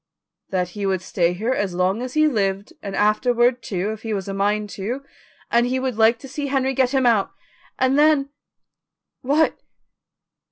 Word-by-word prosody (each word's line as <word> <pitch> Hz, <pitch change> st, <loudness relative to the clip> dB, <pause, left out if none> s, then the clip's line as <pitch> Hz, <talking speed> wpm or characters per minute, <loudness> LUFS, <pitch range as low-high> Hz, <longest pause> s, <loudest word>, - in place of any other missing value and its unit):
"That 180 Hz, -2 st, -1 dB
he 200 Hz, +1 st, -4 dB
would 190 Hz, -1 st, -1 dB
stay 175 Hz, -1 st, +1 dB
here 220 Hz, +8 st, -1 dB
as 195 Hz, -7 st, -2 dB
long 185 Hz, +5 st, +1 dB
as 255 Hz, +2 st, -6 dB
he 310 Hz, 0 st, +4 dB
lived 200 Hz, -6 st, -1 dB
and 200 Hz, -2 st, -5 dB
afterward, 240 Hz, +4 st, +2 dB
too, 195 Hz, 0 st, -2 dB
if 220 Hz, 0 st, -7 dB
he 220 Hz, -2 st, -3 dB
was 195 Hz, -1 st, -4 dB
a 195 Hz, -, -3 dB
mind 205 Hz, +1 st, 0 dB
to, 235 Hz, +8 st, -4 dB, 0.5 s
and 240 Hz, +1 st, +3 dB
he 260 Hz, +1 st, 0 dB
would 260 Hz, -2 st, -2 dB
like 225 Hz, +1 st, +4 dB
to -, -, -8 dB
see 280 Hz, +2 st, -4 dB
Henry 270 Hz, -1 st, 0 dB
get 260 Hz, -1 st, +2 dB
him 265 Hz, -1 st, +1 dB
out; 225 Hz, -5 st, +2 dB, 0.4 s
and 260 Hz, +2 st, +2 dB
then 295 Hz, -2 st, +4 dB, 0.5 s
" -, -, -63 dB
"What?" 290 Hz, +4 st, +1 dB
225 Hz, 190 wpm, -22 LUFS, 195-260 Hz, 0.5 s, he